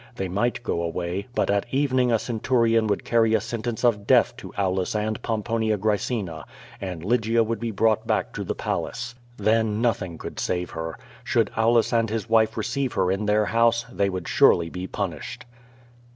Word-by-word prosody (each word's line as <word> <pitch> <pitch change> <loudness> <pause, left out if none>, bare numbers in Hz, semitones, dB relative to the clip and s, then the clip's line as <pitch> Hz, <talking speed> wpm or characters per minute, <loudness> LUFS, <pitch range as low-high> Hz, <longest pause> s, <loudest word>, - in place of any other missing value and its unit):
They 95 - -3
might 120 +6 -1
go 85 -6 -1
away, 85 +3 -3
but - - +1
at 100 +3 -1
evening 130 -3 +2
a 115 - +4
centurion 115 -1 +1
would 100 -2 -1
carry 115 -1 +3
a - - +3
sentence 115 0 -4
of 105 -4 +2
death - - +4
to - - -9
Aulus 95 0 0
and 105 0 -1
Pomponia 110 -1 0
Gracena, 100 -5 -2 0.4
and 90 -4 -5
Lygia 115 +1 +2
would 115 +1 -2
be 115 - -2
brought 110 +1 +1
back - - 0
to - - -4
the - - -3
Palace. 120 0 -3 0.2
Then 110 0 +1
nothing 100 -8 -1
could - - -7
save 90 -1 -2
her. 80 0 -5 0.3
Should - - +1
Aulus 115 +1 +3
and 115 -1 +2
his 110 0 -3
wife 110 -1 +3
receive 130 +4 -1
her 95 -1 +1
in 100 +2 -1
their 105 0 +3
house, 115 +1 +2
they 100 -3 +1
would 95 -2 -4
surely 85 -1 +4
be 90 +1 -5
punished. 100 - -5
110 Hz, 180 wpm, -24 LUFS, 95-115 Hz, 0.4 s, a